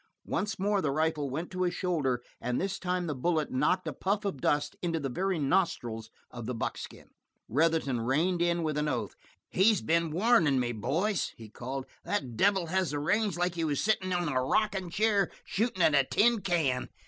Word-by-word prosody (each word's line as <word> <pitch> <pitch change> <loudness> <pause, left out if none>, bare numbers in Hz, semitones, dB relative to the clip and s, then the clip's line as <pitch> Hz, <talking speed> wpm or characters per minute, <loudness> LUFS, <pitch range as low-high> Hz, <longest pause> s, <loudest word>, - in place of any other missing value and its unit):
Once 210 +2 -2
more 200 +1 +1
the 150 - 0
rifle 155 0 0
went 160 +7 -4
to 185 0 -4
his 175 -1 +1
shoulder, 140 -10 0 0.2
and 125 0 -1
this 195 +1 -2
time 180 -1 -1
the 155 - -2
bullet 155 +3 0
knocked 150 +8 +1
a - - -2
puff 205 +2 -1
of 165 -10 -3
dust 145 0 +1
into 165 -2 -1
the 140 -2 -3
very 185 +8 -1
nostrils 135 - 0 0.2
of 120 -2 -7
the 125 - -2
buckskin. 115 - -6 0.4
Retherton 150 -2 +1
reined 160 +9 +1
in 170 -1 +1
with 155 -2 -1
an 150 - 0
oath. 120 -8 -2 0.3
"He's 205 +1 +3
been 165 0 +2
warn 190 +2 +3
in' 135 -2 +3
me, 120 -1 0
boys," 160 - -1
he 110 -2 -11
called. 130 +5 -5 0.2
"That 135 - -2
devil 190 - +3
has 185 +1 0
the 145 - -2
range 205 +4 +1
like 175 0 0
he 170 -1 -2
was 145 -3 0
sitting 195 -3 +1
in 175 -1 0
a 130 -3 0
rockin' 190 +5 0
chair 205 +2 +2 0.2
shooting 205 -4 0
at 155 - +5
a 140 -1 +5
tin 225 - +3
can. 155 -10 0
165 Hz, 200 wpm, -30 LUFS, 135-190 Hz, 0.4 s, at